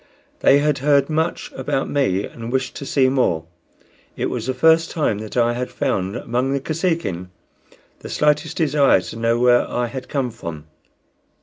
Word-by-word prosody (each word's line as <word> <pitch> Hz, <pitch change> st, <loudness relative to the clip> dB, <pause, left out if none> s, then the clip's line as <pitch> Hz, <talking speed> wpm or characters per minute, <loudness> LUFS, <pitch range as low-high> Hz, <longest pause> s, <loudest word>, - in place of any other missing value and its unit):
They 140 Hz, -, +5 dB
had 145 Hz, -1 st, +1 dB
heard 140 Hz, +2 st, +3 dB
much 160 Hz, +2 st, -1 dB
about 135 Hz, 0 st, -2 dB
me 105 Hz, -9 st, 0 dB
and 115 Hz, 0 st, -8 dB
wished 130 Hz, -1 st, -1 dB
to 140 Hz, -, -7 dB
see 135 Hz, -2 st, +3 dB
more. 125 Hz, -12 st, +1 dB, 0.7 s
It -, -, -1 dB
was 120 Hz, -1 st, -4 dB
the 130 Hz, -, 0 dB
first 160 Hz, +5 st, +4 dB
time 145 Hz, -10 st, -1 dB
that 110 Hz, +2 st, -7 dB
I 120 Hz, 0 st, +3 dB
had 125 Hz, +1 st, -3 dB
found 95 Hz, +2 st, -2 dB
among 125 Hz, +3 st, -1 dB
the 140 Hz, -, 0 dB
Kosekin 155 Hz, -, -2 dB, 0.7 s
the -, -, -9 dB
slightest 150 Hz, 0 st, +1 dB
desire 145 Hz, -, +3 dB
to -, -, -8 dB
know 115 Hz, +1 st, +1 dB
where 120 Hz, 0 st, +3 dB
I 120 Hz, -, -1 dB
had 130 Hz, +2 st, -7 dB
come 135 Hz, -4 st, -1 dB
from. 85 Hz, -9 st, -8 dB
130 Hz, 175 wpm, -21 LUFS, 115-145 Hz, 0.7 s, They